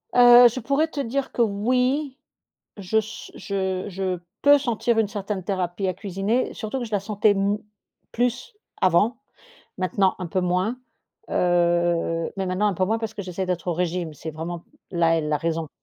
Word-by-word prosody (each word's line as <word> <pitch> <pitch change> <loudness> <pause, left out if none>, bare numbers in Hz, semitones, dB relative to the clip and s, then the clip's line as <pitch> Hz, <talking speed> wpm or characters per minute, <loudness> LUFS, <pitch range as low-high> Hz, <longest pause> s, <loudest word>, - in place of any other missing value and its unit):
Heu, 245 0 +9
je 240 +2 -2
pourrais 280 +6 +1
te 310 -2 -7
dire 275 +1 -2
que 240 - -1
oui, 250 +6 +1 0.6
je 200 +2 0
s 220 +1 -5
je 190 -2 -3
je 185 -1 -2 0.2
peux 285 0 +7
sentir 235 -3 0
une 220 -2 +2
certaine 205 -2 -4
thérapie 185 0 -2
à - - +1
cuisiner 200 +5 -1
surtout 220 +4 -4
que - - -3
je 225 - -10
la 205 - +1
sentais 210 +1 +2
m 200 +1 +1 0.5
plus, 245 - -1 0.3
avant, 195 +6 +3 0.6
maintenant 190 +1 +1
un 180 - -4
peu 185 +3 -1
moins, 180 +6 0 0.5
heu, 175 -1 +1
mais 195 - -1
maintenant 185 +3 0
un 200 - -1
peu 185 - +1
moins 220 +4 0
parce 220 -1 -5
que 205 - -5
j'essaie 185 0 -4
d'être 180 -1 -3
au - - +2
régime, 175 -2 -2
c'est 160 +2 -7
vraiment 165 +2 -6 0.3
là, 165 -2 +2
est - - -1
la 150 0 0
raison. 165 0 -2
195 Hz, 180 wpm, -24 LUFS, 180-230 Hz, 0.6 s, Heu